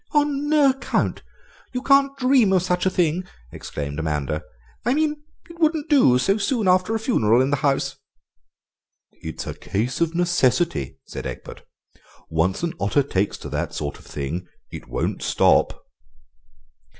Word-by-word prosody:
"On 295 -1 +1
no 295 -3 +5
account! 265 - -2 0.5
You 250 - -2
can't 275 0 +4
dream 255 -5 +4
of 185 -2 +3
such 180 0 0
a - - +4
thing!" 175 -1 +1 0.3
exclaimed 70 +1 -6
Amanda. 75 -1 -2 0.4
"I 250 - +1
mean, 300 -1 0 0.3
it 335 0 -14
wouldn't 315 -1 +1
do, 195 - +6
so 195 +11 +2
soon 215 0 0
after 185 +4 +3
a - - 0
funeral 120 - +2
in 130 +2 +2
the 145 - +2
house." 135 -1 0 1.1
"It's 80 -1 -7
a - - -4
case 120 +10 -3
of 170 0 +1
necessity," 175 - +1
said - - -6
Egbert; - - -8 0.7
"once 85 - 0
an 170 -1 -1
otter 100 +8 +2
takes 100 -6 -1
to - - -8
that - - -3
sort 75 - -4
of - - -18
thing 75 +6 -4 0.2
it - - -9
won't - - -2
stop." - - +2
175 Hz, 155 wpm, -23 LUFS, -, 1.1 s, do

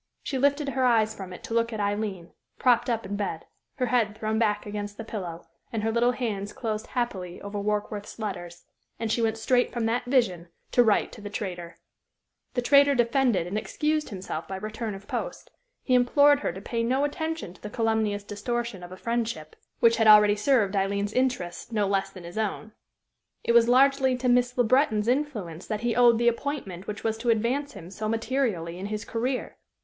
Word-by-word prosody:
She 270 - -2
lifted 285 +1 +2
her 265 -1 0
eyes 225 -3 +3
from 190 -3 -8
it 180 - -10
to - - -6
look 230 0 +1
at 220 - -4
Aileen, 205 -4 -2 0.3
propped 250 -1 +3
up 230 -1 -1
in 200 +1 -4
bed, 195 -5 -3 0.3
her 255 - 0
head 230 -4 +1
thrown 220 0 -1
back 210 -2 +1
against 205 0 -5
the 225 - -5
pillow, 180 -7 -6 0.3
and 220 -2 -2
her 225 - +1
little 240 +2 +2
hands 205 -5 -3
closed 220 -2 -3
happily 190 -8 -3
over 200 0 -5
Warkworth's 210 0 -3
letters; 175 -5 -6 0.4
and 225 -1 -2
she 235 - +1
went 225 -1 +1
straight 245 +2 +2
from 235 -2 -2
that 235 +2 0
vision 210 -10 +1 0.2
to 245 - +5
write 215 -3 +2
to 225 - -11
the 205 - -6
traitor. 175 -5 -5 0.8
The 245 - 0
traitor 280 +2 +5
defended 240 -5 +2
and 195 +4 -2
excused 305 +5 -1
himself 185 -5 -5
by 190 - -5
return 215 +2 -4
of 195 +1 -12
post. - - -5 0.3
He 255 - 0
implored 285 +4 +5
her - - -1
to 190 - -9
pay 230 +2 -2
no 255 +4 +1
attention 315 - -3
to 185 - -20
the 210 - -6
calumnious 220 -2 0
distortion 220 0 -3
of 175 0 -10
a 185 - -8
friendship 230 -9 -3 0.3
which 230 0 +5
had 225 -1 +3
already 210 -1 +8
served 210 -3 +2
Aileen's 200 +1 0
interests 250 -8 -1
no 210 -2 +1
less 195 0 0
than 185 -2 -12
his 175 +5 -6
own. 220 +1 -3 0.7
It - - +1
was 235 0 +5
largely 265 0 +4
to 250 0 -2
Miss 245 0 +2
Le 245 - +5
Breton's 225 -3 +2
influence 240 - -2
that 215 -1 -3
he 240 -1 0
owed 240 -1 +6
the 240 +1 +1
appointment 235 -7 -2
which 210 - -5
was 220 0 -1
to 240 +1 -1
advance 245 +6 +1
him 185 -4 -10
so 215 +2 -4
materially 225 -8 -1
in 195 - -4
his 210 +1 -4
career. 250 +3 -3
220 Hz, 200 wpm, -26 LUFS, 200-245 Hz, 0.8 s, already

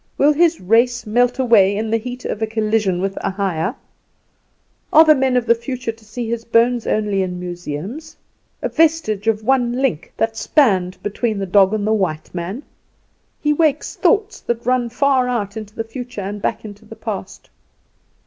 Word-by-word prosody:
Will 295 +2 +4
his 335 +2 +3
race 235 +5 +2
melt 245 +3 +2
away 210 -6 +4
in 220 +1 -2
the 225 - +3
heat 250 +2 -7
of 210 - -3
a 220 - +1
collision 215 -4 0
with 195 0 -2
a - - -1
higher? 190 - -2 1.2
Are 320 +1 +8
the 310 - +7
men 265 -3 +1
of 245 - 0
the 235 - +5
future 240 0 -4
to 225 0 -20
see 225 +2 -6
his 230 0 -3
bones 235 +1 +2
only 210 -2 0
in 180 -1 -3
museums 180 - -6 0.5
a - - 0
vestige 310 -11 +1
of 220 -1 +1
one 245 0 +2
link 250 - -1
that 225 0 0
spanned 200 - +2
between 215 +1 -2
the 195 - -2
dog 195 +1 +4
and 215 -2 -1
the 215 - +2
white 180 -7 -2
man? 185 +10 -5 0.8
He 300 0 +2
wakes 305 -1 0
thoughts 430 -2 +1
that 235 -1 -3
run 250 -1 +1
far 260 +1 +2
out 210 -5 -2
into 215 -1 -8
the 225 - -2
future 245 0 -7
and 200 +2 -5
back 220 +1 -2
into 205 0 -10
the - - -12
past." - - -7
225 Hz, 185 wpm, -19 LUFS, 200-250 Hz, 1.2 s, Are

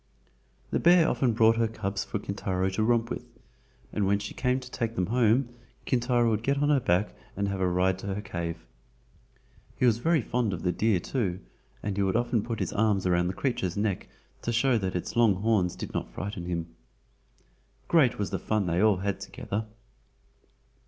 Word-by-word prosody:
The - - +1
bear 175 -1 +6
often 125 -4 +1
brought 115 0 +4
her 115 -1 +2
cubs 100 -3 -3
for - - -3
Kintaro 95 -2 -2
to 95 - -1
romp 115 +1 +2
with, - - -4 0.7
and 100 -2 +1
when 100 +1 +3
she 100 0 -6
came 125 0 0
to 125 -1 -11
take 115 -2 -2
them 90 - +1
home 120 +3 +2 0.4
Kintaro 120 -2 +2
would 110 -1 0
get 140 +4 +1
on 145 +1 +2
her 145 -2 +4
back 95 -3 +1 0.2
and 100 0 0
have 100 -1 -3
a 95 - +3
ride 90 +1 +1
to 100 0 -4
her 105 - -3
cave. 85 -3 -5 1.1
He - - +2
was 115 -2 +3
very 160 0 +2
fond 115 -4 0
of 85 - -5
the 90 - +2
deer 105 -1 +2
too, 95 -4 -2 0.4
and 100 -2 -2
would 95 0 +1
often 120 -1 +1
put 115 +1 -4
his - - -2
arms 105 -3 +2
round 90 0 +2
the 95 - -4
creature's 105 -9 -1
neck 100 -2 -1 0.3
to 120 - -2
show 120 0 +3
that 95 -2 -3
its 90 - -4
long 115 -4 +5
horns 100 -3 +1
did - - -7
not - - -3
frighten 100 -3 -5
him. 85 -2 -4 1.1
Great 145 -9 +4
was 100 -5 -2
the - - -1
fun 110 -2 0
they 85 +1 +1
all 105 -3 +4
had 100 +1 -2
together. 110 +2 -5
105 Hz, 195 wpm, -28 LUFS, 95-120 Hz, 1.1 s, bear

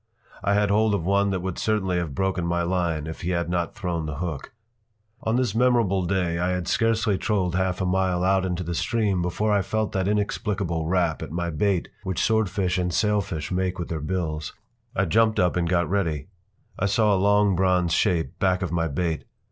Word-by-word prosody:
I 100 - +2
had 105 -1 +2
hold 105 0 +3
of 85 - -3
one 100 +1 +2
that 95 -2 -1
would 95 -1 -4
certainly 95 -5 0
have 85 -6 -3
broken 95 -2 0
my 85 0 0
line 85 -4 -1
if 80 0 -7
he 85 - -2
had 85 -1 -1
not 85 -1 -1
thrown 85 -5 -3
the 75 - -4
hook. 80 -3 -5 0.7
On 110 - 0
this 125 -5 +1
memorable 115 -6 +2
day 90 -3 0
I 90 +1 +1
had 90 -1 -3
scarcely 110 -3 +1
trolled 95 -5 0
half 95 0 0
a - - +1
mile 90 -1 +1
out 95 0 +3
into 90 -1 -2
the 85 +1 -4
Stream 100 0 0
before 95 +5 0
I 100 - +3
felt 110 +2 -1
that 95 -1 -1
inexplicable 100 -5 -1
rap 85 -3 +1
at - - -6
my 85 +1 -2
bait 90 +3 0
which 95 -3 -3
swordfish 100 -4 +1
and 90 0 0
sailfish 100 -6 0
make 90 0 -1
with 85 - -5
their 80 -2 -3
bills. 80 -2 -3 0.4
I 100 - +2
jumped 110 +5 +3
up 90 -1 +2
and 85 -1 0
got 85 -2 +2
ready. 85 -5 -1 0.5
I 100 - +2
saw 105 +1 +3
a - - +3
long 105 -1 +4
bronze 90 -2 +2
shape 85 -10 0
back 95 -1 +1
of 90 - -3
my 85 -1 0
bait. 80 +2 -2
90 Hz, 205 wpm, -25 LUFS, 85-100 Hz, 0.7 s, long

